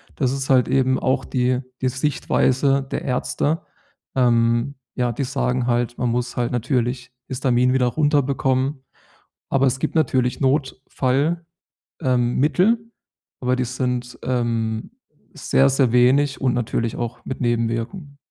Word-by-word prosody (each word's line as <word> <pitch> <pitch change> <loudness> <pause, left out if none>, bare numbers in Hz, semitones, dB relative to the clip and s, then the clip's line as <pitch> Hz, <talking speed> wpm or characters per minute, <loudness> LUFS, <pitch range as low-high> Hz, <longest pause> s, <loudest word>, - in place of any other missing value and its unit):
Das 130 -3 0
ist 135 -1 -4
halt 130 -2 +4
eben 130 0 +2
auch 130 0 0
die 125 0 0 0.2
die 130 - +1
Sichtweise 135 0 +1
der - - -2
Ärzte. 145 +5 -1 0.5
Ähm, 120 +1 +2 0.2
ja, 125 -1 0
die 140 - -2
sagen 125 -2 -1
halt, 120 0 0
man 125 - 0
muss 125 +1 -2
halt 120 -1 0
natürlich 125 0 -1 0.2
Histamin 125 -1 +1
wieder 130 -1 +2
runterbekommen, 135 -1 +1 0.7
aber 135 0 +3
es 130 +1 0
gibt - - -2
natürlich 130 -5 +1
Notfall, 135 +3 0 0.6
ähm, 125 -2 +1
Mittel, 220 - +2 0.5
aber 125 0 +1
die 130 - 0
sind, 125 0 -3
ähm, 115 -3 -1 0.4
sehr, 135 0 +2
sehr 130 -3 +2
wenig 130 +4 +3
und 130 -2 +2
natürlich 115 -1 -1
auch 120 -1 -5
mit 130 - -5
Nebenwirkung. 120 +6 -2
130 Hz, 135 wpm, -22 LUFS, 120-135 Hz, 0.7 s, halt